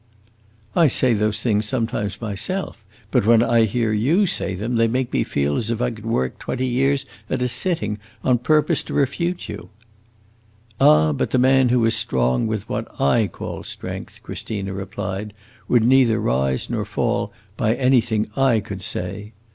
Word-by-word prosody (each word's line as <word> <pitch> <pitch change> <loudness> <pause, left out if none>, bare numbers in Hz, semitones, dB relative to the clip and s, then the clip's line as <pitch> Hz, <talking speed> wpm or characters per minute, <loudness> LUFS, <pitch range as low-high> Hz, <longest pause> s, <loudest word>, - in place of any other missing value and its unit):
"I 170 -3 +5
say 130 -2 +2
those 105 0 0
things 105 -3 +1
sometimes 105 -4 -2
myself, 110 - -3 0.3
but - - +3
when 115 +1 +5
I 115 -1 +3
hear 110 +1 0
you 145 - +2
say 165 - -1
them 115 +6 -2
they 115 0 +4
make 125 +2 -2
me - - +2
feel 70 +1 -1
as 115 - -1
if 115 -1 -1
I 125 0 0
could 110 -1 -9
work 65 - -1
twenty 130 - -3
years 135 +2 +1 0.2
at 130 -1 -1
a - - +1
sitting, 120 - 0 0.2
on 125 -2 +3
purpose 155 +5 +2
to - - -3
refute 170 +6 -1
you!" - - -8 1.1
"Ah, 75 0 +5
the 75 - 0
man 130 0 +4
who 120 -2 +3
is 115 - +3
strong 65 - +1
with 110 -2 -3
what - - -3
I 110 +9 +3
call - - -7
strength," - - -7
Christina 100 -3 -5
replied, 100 +1 -5 0.3
"would 120 -2 +3
neither 120 -2 +4
rise 65 - 0
nor - - -2
fall - - -1 0.2
by 110 +2 +1
anything 120 -4 +2
I 135 -4 +3
could 100 -2 -7
say! 100 +4 -4
115 Hz, 170 wpm, -21 LUFS, 105-125 Hz, 1.1 s, I